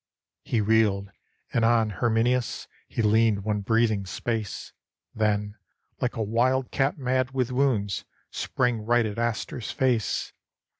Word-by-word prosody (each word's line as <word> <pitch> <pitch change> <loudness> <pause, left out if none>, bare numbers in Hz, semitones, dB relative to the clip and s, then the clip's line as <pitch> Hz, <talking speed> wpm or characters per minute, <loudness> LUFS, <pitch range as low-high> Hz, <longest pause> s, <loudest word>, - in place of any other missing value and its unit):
He 115 - 0
reeled, 100 -2 +2 0.4
and 115 - +2
on 115 -2 +3
Herminius 120 +2 0 0.2
He 115 - -2
leaned 110 -1 +3
one 105 0 -1
breathing 110 -2 +1
space; 110 +2 -4 0.4
Then, 105 -1 0 0.4
like 125 - -1
a 115 - -1
wild 125 +4 +1
cat 135 +3 +1
mad 130 -1 0
with 130 -2 0
wounds, 115 -8 0 0.3
Sprang 125 -2 0
right 120 +1 +3
at 105 +1 -4
Astur's 115 0 -2
face. 125 -5 0
115 Hz, 130 wpm, -26 LUFS, 105-125 Hz, 0.4 s, on